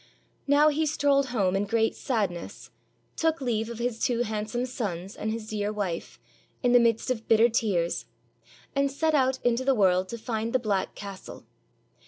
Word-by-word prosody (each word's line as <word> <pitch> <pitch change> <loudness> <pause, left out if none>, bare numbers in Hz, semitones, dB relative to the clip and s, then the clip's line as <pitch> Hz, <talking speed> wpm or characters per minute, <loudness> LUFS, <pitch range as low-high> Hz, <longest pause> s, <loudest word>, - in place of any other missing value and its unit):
Now 290 +2 +5
he 310 +1 0
strolled 280 -2 +2
home 200 -7 +1
in 200 +1 +1
great 225 +2 +1
sadness, 200 -9 -3 0.4
took 320 0 +1
leave 230 -4 -1
of 235 - -6
his 240 -1 -2
two 240 -1 +1
handsome 220 +3 -2
sons 195 -7 -4
and 215 - -3
his 220 -1 -5
dear 210 -1 -2
wife, 195 -5 -4 0.4
in 245 - +3
the 245 - +7
midst 230 +1 +2
of 225 -3 -3
bitter 225 +1 +5
tears, 195 -7 0 0.7
and 275 0 +2
set 315 +3 0
out 265 -2 +3
into 245 +1 +2
the 270 0 +3
world 185 -3 +3
to 235 - -5
find 225 0 -3
the - - +5
black 210 -6 -1
castle. 200 -2 -9
230 Hz, 175 wpm, -27 LUFS, 205-255 Hz, 0.7 s, the